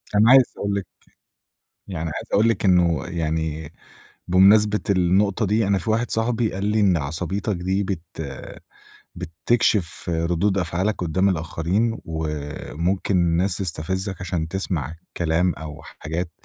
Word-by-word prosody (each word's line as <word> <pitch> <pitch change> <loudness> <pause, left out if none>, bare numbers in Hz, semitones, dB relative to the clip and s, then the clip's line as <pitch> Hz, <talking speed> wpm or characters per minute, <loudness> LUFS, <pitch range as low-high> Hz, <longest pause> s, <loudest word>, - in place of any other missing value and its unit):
أنا 105 +3 +5
عايز 130 -1 +6
أقول 100 0 -1
لِك 100 - -4 1.0
يعني 85 -4 -4
عايز - - -5
أقول 110 +3 +4
لِك 115 - 0
إنه 90 -3 +3
يعني 80 -2 -3 0.6
بمناسبة 105 +3 +5
النقطة 95 +3 +2
دي، 105 +2 +1
أنا 100 0 +2
في 110 - -3
واحد 115 +2 0
صاحبي 115 0 0
قال 95 +1 -3
لي: 105 +1 +2
"إن 95 -4 +4
عصبيتك 85 +7 -2
دي 95 +3 -1
بت 95 -4 -3 1.1
بتكشف 90 +2 0
ردود 85 +4 0
أفعالك 90 +3 0
قُدّام 90 +3 +1
الآخرين 90 +6 -1
وممكن 80 +4 -2
الناس 85 +2 +2
تستفزَّك 95 +2 -2
عشان 90 -3 -2
تسمع 80 -5 -3
الكلام 85 +1 0
أو 80 0 -9
حاجات 80 +4 -5
90 Hz, 130 wpm, -23 LUFS, 80-100 Hz, 1.1 s, عايز